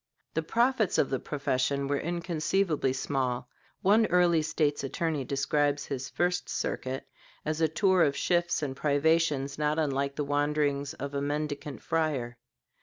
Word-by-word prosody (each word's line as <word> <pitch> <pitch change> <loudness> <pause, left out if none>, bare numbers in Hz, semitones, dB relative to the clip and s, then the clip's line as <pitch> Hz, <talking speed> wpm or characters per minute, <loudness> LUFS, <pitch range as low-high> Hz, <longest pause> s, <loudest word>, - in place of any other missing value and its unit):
The 160 - 0
profits 235 +4 +2
of 135 - +2
the 135 - 0
profession 140 -1 -1
were 140 0 0
inconceivably 170 -2 0
small. 130 -2 -1 0.4
One 215 +3 +5
early 175 -2 +4
State's 150 -2 0
Attorney 150 +1 -1
describes 145 +1 0
his 130 -2 -4
first 180 0 0
circuit 130 +1 -3 0.4
as 155 +1 -1
a 160 - +5
tour 185 +3 +3
of 140 -3 +3
shifts 175 -2 +1
and 135 -2 -3
privations 145 -1 +1
not 150 +1 +1
unlike 140 -2 0
the 150 - -1
wanderings 145 0 0
of 140 0 -5
a 140 - -1
mendicant 145 0 -3
friar. 140 -7 -1
150 Hz, 145 wpm, -29 LUFS, 140-165 Hz, 0.4 s, One